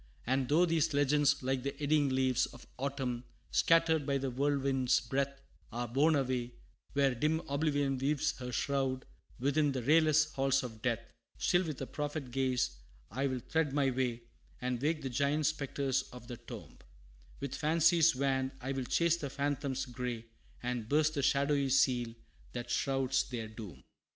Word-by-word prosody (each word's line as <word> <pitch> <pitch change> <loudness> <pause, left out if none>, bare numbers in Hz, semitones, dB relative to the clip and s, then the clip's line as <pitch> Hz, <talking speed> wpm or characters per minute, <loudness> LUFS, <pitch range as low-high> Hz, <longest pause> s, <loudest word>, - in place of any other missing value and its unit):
And 130 +1 0
though 165 +5 +5
these 165 -2 +1
legends, 145 -1 +3
like 130 0 0
the 140 +2 -4
eddying 145 -1 +2
leaves 130 -1 +2
Of 120 - -14
autumn, 130 -3 -2 0.3
scattered 165 -2 +4
by 140 0 0
the 135 -1 -2
whirlwind's 135 -1 +2
breath, 140 +3 -2 0.3
Are 120 +1 -3
borne 145 +7 +3
away 125 -3 -1 0.4
where 140 -2 +3
dim 150 +6 +1
Oblivion 140 -2 0
weaves 145 +3 +1
Her 125 -1 -5
shroud, 135 0 -1 0.3
within 145 +2 +2
the 130 -2 -3
rayless 155 +2 +4
halls 135 0 +2
of 110 -3 -8
death; 115 -1 -2 0.3
Still 180 0 +2
with 150 -4 -4
a - - -3
prophet 145 -2 -4
gaze 130 - 0 0.3
I'll 130 +3 -1
thread 160 -4 +1
my 140 -2 +2
way, 120 -2 -1 0.4
And 125 -1 -2
wake 155 +1 0
the 135 - -2
giant 145 +4 +1
spectres 140 -2 0
of 125 -1 -11
the 120 -1 -6
tomb; - - -10 0.6
With 140 -2 -4
fancy's 165 +1 +4
wand 130 0 0
I'll 135 0 -3
chase 170 +5 +2
the 145 -4 -4
phantoms 140 -1 -2
gray, 125 -2 -4 0.4
And 120 -2 -3
burst 155 +1 +3
the 145 - -1
shadowy 140 0 +2
seal 125 -3 +2 0.4
that 120 -1 -5
shrouds 135 -1 +1
their 115 -3 -4
doom. 110 -4 -10
135 Hz, 160 wpm, -33 LUFS, 125-145 Hz, 0.6 s, though